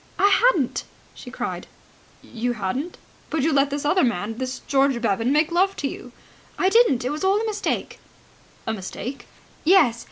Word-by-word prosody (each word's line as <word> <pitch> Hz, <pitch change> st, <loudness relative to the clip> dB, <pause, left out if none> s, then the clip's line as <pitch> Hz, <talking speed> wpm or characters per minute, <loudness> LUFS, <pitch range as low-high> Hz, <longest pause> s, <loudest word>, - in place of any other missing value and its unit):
"I 405 Hz, -, +4 dB
hadn't," 385 Hz, -, +2 dB, 0.3 s
she -, -, -11 dB
cried. -, -, -5 dB, 0.6 s
"You 245 Hz, +1 st, -3 dB
hadn't? 240 Hz, -, -4 dB, 0.3 s
But 315 Hz, -4 st, -1 dB
you 320 Hz, +1 st, +2 dB
let 275 Hz, 0 st, +3 dB
this 285 Hz, +1 st, -4 dB
other 365 Hz, +5 st, +3 dB
man, 225 Hz, 0 st, -1 dB
this 260 Hz, 0 st, -3 dB
George 275 Hz, -2 st, +2 dB
Bevan, 230 Hz, +2 st, 0 dB
make 305 Hz, +3 st, +2 dB
love 380 Hz, +3 st, +2 dB
to 285 Hz, -, -2 dB
you." 250 Hz, -, -8 dB, 0.5 s
"I 375 Hz, -, +3 dB
didn't! 400 Hz, -, +4 dB
That 250 Hz, -, -1 dB
was 300 Hz, +3 st, -4 dB
all 390 Hz, +2 st, +3 dB
a 450 Hz, -, -2 dB
mistake." 425 Hz, -2 st, -3 dB, 0.7 s
"A 225 Hz, -, -1 dB
mistake?" 220 Hz, +6 st, -7 dB, 0.4 s
"Yes. 310 Hz, -10 st, +4 dB
280 Hz, 170 wpm, -23 LUFS, 240-365 Hz, 0.7 s, I